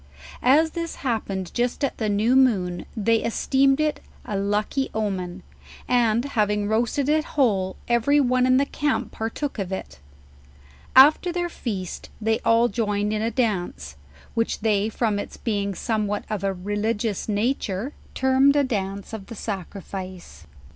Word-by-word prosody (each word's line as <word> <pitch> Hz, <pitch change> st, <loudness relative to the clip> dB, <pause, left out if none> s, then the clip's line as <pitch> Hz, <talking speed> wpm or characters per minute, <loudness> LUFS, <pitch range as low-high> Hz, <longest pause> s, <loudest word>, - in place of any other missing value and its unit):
As 310 Hz, +5 st, +4 dB
this 335 Hz, 0 st, -4 dB
happened 195 Hz, -6 st, -2 dB
just 245 Hz, +4 st, -1 dB
at 275 Hz, -, -1 dB
the 215 Hz, -2 st, 0 dB
new 215 Hz, +5 st, +2 dB
moon, 195 Hz, -10 st, +2 dB
they 225 Hz, +2 st, +3 dB
esteemed 270 Hz, +5 st, +2 dB
it 305 Hz, -1 st, +1 dB, 0.3 s
a 210 Hz, -, -4 dB
lucky 210 Hz, +7 st, 0 dB
omen; 190 Hz, -4 st, -3 dB, 0.4 s
and 235 Hz, -1 st, +2 dB
having 210 Hz, -6 st, 0 dB
roasted 235 Hz, +5 st, 0 dB
it 310 Hz, +1 st, +3 dB
whole, 205 Hz, -12 st, +1 dB
every 240 Hz, +5 st, +3 dB
one 255 Hz, -2 st, +3 dB
in 255 Hz, 0 st, +5 dB
the 280 Hz, -, +3 dB
camp 290 Hz, 0 st, -1 dB
partook 225 Hz, +4 st, -4 dB
of 190 Hz, -1 st, -3 dB
it* 190 Hz, -, -6 dB, 1.0 s
After 300 Hz, +7 st, +7 dB
their 350 Hz, 0 st, -2 dB
feast, 195 Hz, -, -5 dB
they 220 Hz, 0 st, +1 dB
all 230 Hz, +1 st, +4 dB
joined 210 Hz, -1 st, -1 dB
in 215 Hz, -, -1 dB
a 225 Hz, -, +1 dB
dance, 180 Hz, -, -2 dB, 0.4 s
which 230 Hz, -1 st, -1 dB
they 210 Hz, -1 st, +2 dB
from 220 Hz, -2 st, 0 dB
ite -, -, -7 dB
being 200 Hz, -3 st, -1 dB
somewhat 210 Hz, -1 st, -1 dB
of 205 Hz, -2 st, -2 dB
a 195 Hz, -, +1 dB
religious 205 Hz, +3 st, -2 dB
nature, 215 Hz, +2 st, -1 dB, 0.2 s
termed 265 Hz, +2 st, +4 dB
a 290 Hz, -, +4 dB
dance 200 Hz, -5 st, -3 dB
of 205 Hz, -3 st, -7 dB
the 230 Hz, -, -8 dB
sacrifice. 185 Hz, -, -7 dB
220 Hz, 150 wpm, -24 LUFS, 200-260 Hz, 1.0 s, After